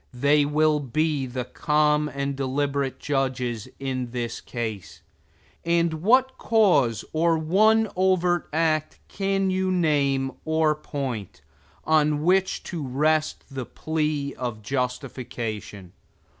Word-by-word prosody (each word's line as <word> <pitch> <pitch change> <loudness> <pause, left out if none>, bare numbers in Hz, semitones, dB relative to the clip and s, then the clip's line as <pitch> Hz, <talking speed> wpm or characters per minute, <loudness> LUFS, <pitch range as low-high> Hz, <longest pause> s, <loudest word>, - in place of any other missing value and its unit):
They 145 +3 +3
will 150 +1 +2
be 145 +1 -1
the 125 0 -4
calm 150 +2 +1
and 140 -1 -3
deliberate 135 0 -1
judges 130 -5 -2
in 130 -2 -3
the 120 -1 -4
case; 110 -6 -5 0.6
and 170 -1 +2
what 260 +6 +3
cause 150 - +3
or 165 +1 +2
one 215 +8 +3
overt 180 -2 +2
act 155 -1 0
can 195 -1 0
you 185 0 0
name 140 -6 +1
or 160 -1 +2
point, 135 - -5 0.4
on 150 -1 +2
which 190 +2 +2
to 170 -3 -5
rest 155 +4 0
the 130 -3 -5
plea 150 -3 -2
of 120 -4 -4
justification? 120 - -4
150 Hz, 115 wpm, -25 LUFS, 130-165 Hz, 0.6 s, They